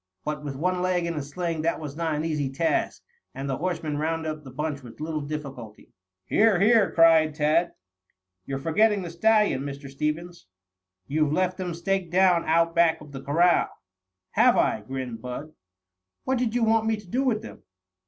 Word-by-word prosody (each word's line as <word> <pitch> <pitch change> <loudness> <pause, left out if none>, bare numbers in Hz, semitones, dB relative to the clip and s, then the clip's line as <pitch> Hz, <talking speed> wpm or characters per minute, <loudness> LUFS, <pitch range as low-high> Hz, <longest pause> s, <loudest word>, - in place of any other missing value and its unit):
But 150 -1 -3
with 140 -2 -5
one 180 +5 -1
leg 180 -1 +1
in 170 - -2
a 150 - -3
sling 165 +3 -3
this 165 +2 0
was 150 -3 -7
not 165 -1 -1
an 150 +2 -2
easy 150 -4 -1
task, 160 +5 -1 0.3
and 135 +1 -5
the 135 -1 -2
horsemen 160 -4 -2
rounded 160 0 -1
up 155 0 -8
the 135 - -10
bunch 145 +2 -4
with 120 -3 -13
little 155 0 -3
difficulty. 140 -7 -8 0.3
"Here, 215 -4 +3
here!" 215 0 +5
cried 160 -2 +5
Tad. 155 +3 +2 0.7
"You're 135 - -2
forgetting 200 +8 +2
the 170 - -6
stallions, 210 -4 +2
Mr. 140 -1 -7
Stevens. 150 - -4 0.6
You've 150 +4 0
left 185 +3 0
them 180 -3 -4
staked 185 +1 -1
down 180 -2 +4
out 165 +1 +2
back 170 -1 +3
of 150 -1 -13
the 135 -1 -7
corral." 170 +6 +3 0.6
"Have - - +4
I?" - - +2
grinned 125 0 -6
Bud. 130 +5 -7 0.7
"What 260 -1 0
did 240 -2 -1
you 245 - +2
want 225 0 +3
me 220 -1 +1
to 210 -2 -13
do 250 +9 -1
with 235 -5 0
them?" - - -10
160 Hz, 185 wpm, -25 LUFS, 145-180 Hz, 0.7 s, here